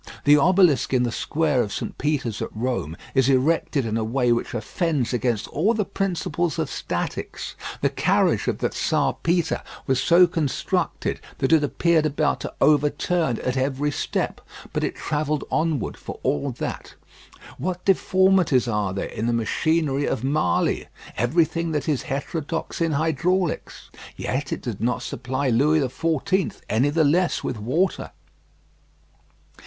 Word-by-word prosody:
The 145 +1 +7
obelisk 170 -3 +4
in 125 - +3
the 120 - 0
square 150 0 +1
of 105 -3 -3
St. - - -4
Peter's 135 -7 -1
at - - -2
Rome 105 - -2 0.2
is 130 -1 +3
erected 140 0 +2
in 110 0 -1
a 115 - 0
way 120 +2 +1
which 120 0 -1
offends 135 - -1
against 120 -3 0
all 205 +10 +1
the 210 -2 0
principles 175 -3 -2
of 155 -4 -2
statics. - - -4 0.3
The - - +3
carriage - - +2
of - - 0
the - - -1
Czar - - 0
Peter 170 0 +1 0.2
was 130 -1 +1
so 175 +2 +6
constructed 165 -6 -1 0.2
that 135 - +1
it 155 -2 +5
appeared 160 +1 +2
about 150 0 0
to - - -6
overturn 150 0 +2
at 125 - -1
every 135 +2 0
step; - - -2 0.3
but - - -1
it - - -1
travelled 150 -1 -1
onward 155 -6 0
for - - -8
all 75 - 0
that. - - -6 0.6
What 180 +5 -3
deformities 185 -8 +3
are 105 -4 -1
there 100 - -2
in 110 - -4
the 120 - +1
machinery 145 +5 +1
of 110 - -2
Marly! 135 - +1 0.3
Everything 165 - +1
that 150 +1 -2
is 150 -4 +1
heterodox 160 +4 -4
in 165 -2 +1
hydraulics. 165 +4 -1 0.2
Yet 135 +2 -3
it - - -3
did 115 -6 -5
not 125 +2 0
supply 130 +2 -2
Louis 145 +7 +3
XIV. 165 +7 -1
any 120 +7 +2
the 160 +2 +2
less 170 +5 +2
with 115 - -3
water. 155 - -1
145 Hz, 150 wpm, -23 LUFS, 125-165 Hz, 0.6 s, The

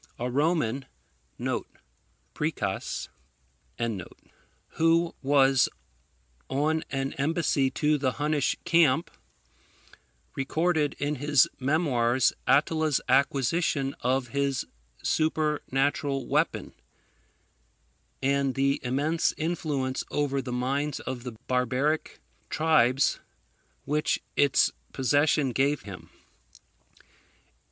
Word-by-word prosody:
A 125 +1 -3
Roman, 140 -3 +1 1.5
[Priscus.] 110 -11 -3 1.6
who 165 +1 +2
was 135 -1 +4 0.8
on 155 +4 0
an 135 0 -2
embassy 145 -2 +1
to 150 +2 +1
the 130 -2 0
Hunnish 150 -1 0
camp, 165 -3 +3 1.2
recorded 155 +2 0
in 145 +1 -2
his 145 -1 +4
memoirs 130 -4 +2
Attila's 155 0 +3
acquisition 140 +2 +1
of 125 -1 0
this 140 -1 0 0.4
supernatural 145 -3 0
weapon, - - 0 1.5
and 140 -1 +1
the 140 0 +1
immense 145 +6 0
influence 150 -5 -2
over 140 -2 0
the 130 -1 -6
minds 135 +4 -1
of 130 -2 -5
the 125 -1 -7
barbaric 130 +5 0 0.3
tribes 140 -5 +3 0.7
which 150 +1 +1 0.2
its 145 -2 +4 0.2
possession 145 +1 +2
gave 140 +4 +1
him. 100 -3 -10
140 Hz, 80 wpm, -27 LUFS, 130-155 Hz, 1.6 s, was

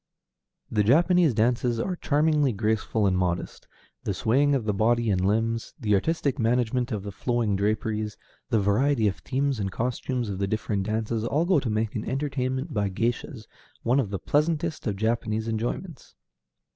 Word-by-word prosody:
The 105 -2 +2
Japanese 165 - +4
dances 120 +1 +1
are 180 +9 -1
charmingly 150 -4 +2
graceful 110 0 0
and 95 -2 +2
modest; 90 -1 -2 0.4
the - - -2
swaying 140 +5 +2
of 125 -5 -1
the 105 - +1
body 115 +2 +2
and 90 -1 +1
limbs, 115 +3 0
the 105 -2 +1
artistic 140 - 0
management 120 +2 +1
of 105 -3 -3
the 100 - -5
flowing 115 0 0
draperies, 105 +1 -1 0.3
the 110 - +3
variety 110 +4 +2
of 95 - -1
themes 135 -1 -1
and 95 -2 -2
costumes 125 +2 -2
of 95 -2 -4
the 100 - 0
different 100 -1 -2
dances, 110 +1 -1
all 145 +8 +1
go 180 -3 +4
to 130 - -3
make 110 0 -1
an 110 - -3
entertainment 135 +1 -2
by 105 -3 0
géishas 115 +3 -2 0.4
one 125 +4 +3
of 120 -7 0
the 100 - -2
pleasantest 155 - 0
of 105 - 0
Japanese 110 +1 -1
enjoyments. 120 - -4
115 Hz, 170 wpm, -26 LUFS, 105-135 Hz, 0.4 s, Japanese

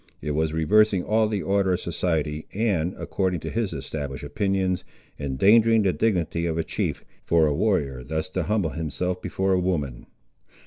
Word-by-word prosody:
It 75 - -3
was 80 +1 0
reversing 95 +4 +3
all 110 0 +2
the 105 -3 -2
order 100 -1 +2
of 90 - 0
society, 80 -2 -2
and, 95 -6 0
according 95 -3 -1
to - - -5
his 115 -3 -1
established 70 -3 -5
opinions, 95 -2 0 0.4
endangering 105 - +4
the 95 -2 +2
dignity 85 -6 0
of 80 -1 -1
a 80 - +1
chief, - - -3 0.2
for 85 -2 +3
a 75 - +2
warrior 70 -9 0
thus 80 +5 -3
to 95 0 -2
humble 95 -2 0
himself 90 +3 -3
before 95 0 0
a 90 - +3
woman. 75 -9 -2
90 Hz, 170 wpm, -25 LUFS, 80-100 Hz, 0.4 s, endangering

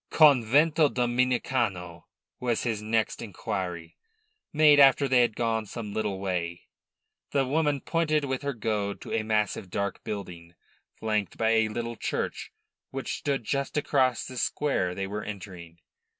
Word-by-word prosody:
"Covento 150 +2 +5
Dominicano?" 120 -8 0 0.3
was 120 -2 -1
his 115 -3 -1
next 110 0 0
inquiry, 90 -5 -5 0.5
made 150 -1 +6
after 140 0 +6
they 130 -1 +4
had 120 -3 +1
gone 110 -2 -1
some 105 -1 -6
little 105 -3 -2
way. 90 -3 -3 0.7
The 140 -2 +2
woman 145 0 +1
pointed 155 -3 0
with 130 -1 -2
her 140 -2 -3
goad 105 -2 -2
to - - -7
a 115 - +1
massive, 105 -3 -1
dark 100 +2 -3
building, 85 -4 -7 0.4
flanked 105 -4 -1
by 110 0 +2
a 110 -1 +3
little 115 +1 -4
church, - - -3 0.4
which 135 -2 -4
stood 140 -4 -1
just 140 +5 -2
across 130 -4 +1
the 130 - -8
square 120 -10 0
they 95 - -2
were 105 +2 -4
entering. 90 -5 -8
115 Hz, 145 wpm, -27 LUFS, 100-135 Hz, 0.7 s, made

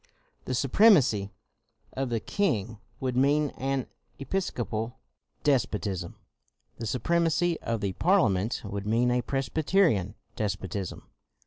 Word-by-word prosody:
The 130 - -2
supremacy 135 - +4 0.6
of 135 -1 -2
the 115 -1 0
king 115 - -1 0.2
would 130 -2 -2
mean 145 +3 +3
an 135 -1 -2 0.3
Episcopal 120 - -3 0.5
despotism; 105 -10 0 0.6
the 115 - -3
supremacy 170 +7 +1
of 115 -2 -2
the 100 -2 -1
Parliament 115 - +2
would 100 0 -5
mean 120 +3 +2
a 125 0 +2
Presbyterian 135 - +1 0.2
despotism. 95 -2 -3
125 Hz, 105 wpm, -28 LUFS, 105-145 Hz, 0.6 s, supremacy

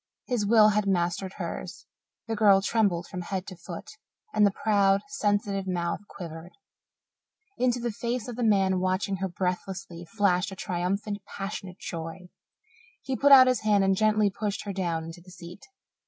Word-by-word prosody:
His 235 -6 -1
will 215 -1 +6
had 210 -1 +1
mastered 185 +1 0
hers; - - -6 0.4
the 225 - -2
girl 205 -3 +5
trembled 200 -6 +1
from 180 0 -6
head 185 +1 -4
to 190 - -8
foot, 170 0 -9 0.5
and 210 -1 +5
the 195 - -3
proud, 200 -2 +3
sensitive, 205 -6 -1
mouth 175 -2 -1
quivered. 165 -1 -9 1.1
Into 245 0 +2
the 235 0 -2
face 235 +2 -3
of 245 - -6
the 245 - -5
man 195 -4 +3
watching 185 +1 0
her 190 +1 -2
breathlessly 180 -1 -4
flashed 190 -2 +2
a - - -7
triumphant, 195 +3 -2 0.2
passionate 195 -2 -6
joy. 165 +1 -7 0.7
He 265 -1 -2
put 285 +2 +3
out 265 -2 +10
his 255 -1 +2
hand 210 -2 +3
and 195 0 +3
gently 215 0 +2
pushed 205 0 -3
her 200 - -5
down 170 -4 -2
into 165 +2 -9
the 180 - -17
seat. 180 +7 -12
195 Hz, 170 wpm, -27 LUFS, 180-215 Hz, 1.1 s, out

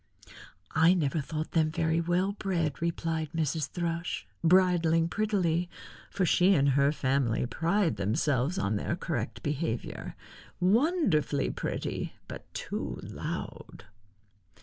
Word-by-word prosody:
"I 165 +4 +5
never 155 -2 0
thought 155 +2 -4
them 160 -2 +2
very 160 +1 +1
well 175 +3 +1
bred," 175 -8 -2
replied 165 -2 -1
Mrs. 155 -2 -1
Thrush, 170 -1 -3 0.2
bridling 170 -2 +4
prettily, 180 -5 0 0.4
for 195 -2 0
she 180 +3 +4
and 140 -1 +3
her 140 +1 +3
family 130 -5 0
pride 165 - 0
themselves 130 - 0
on 105 - 0
their 170 - -2
correct 145 -10 -4
behavior. 145 -5 -3 0.4
"Wonderfully 205 - +2
pretty, - - -4
but - - -9
too - - -4
loud." - - -6
165 Hz, 115 wpm, -29 LUFS, 145-180 Hz, 0.4 s, I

